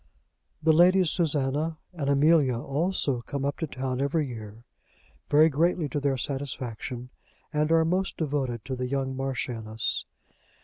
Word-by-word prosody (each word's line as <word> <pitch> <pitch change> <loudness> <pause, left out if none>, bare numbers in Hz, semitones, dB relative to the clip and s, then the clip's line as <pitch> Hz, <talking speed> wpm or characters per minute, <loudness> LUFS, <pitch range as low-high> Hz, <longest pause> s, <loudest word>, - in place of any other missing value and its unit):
The 160 0 +5
Ladies 180 +1 +5
Susanna 155 -1 0 0.2
and 145 -5 -2
Amelia 140 -3 +4
also 140 -1 -1
come 140 +3 -4
up 140 - -2
to 160 - -2
town 130 -1 -3
every 145 +2 +1
year, 110 -3 -8 0.7
very 150 +2 +6
greatly 165 +2 +1
to 145 - -1
their 140 -1 0
satisfaction, 125 -2 -4 0.4
and 150 +1 +1
are 165 0 +5
most 185 +3 0
devoted 135 -7 -2
to 130 -1 -3
the 125 0 -3
young 135 0 -2
Marchioness. 120 -4 -2
140 Hz, 140 wpm, -27 LUFS, 130-160 Hz, 0.7 s, very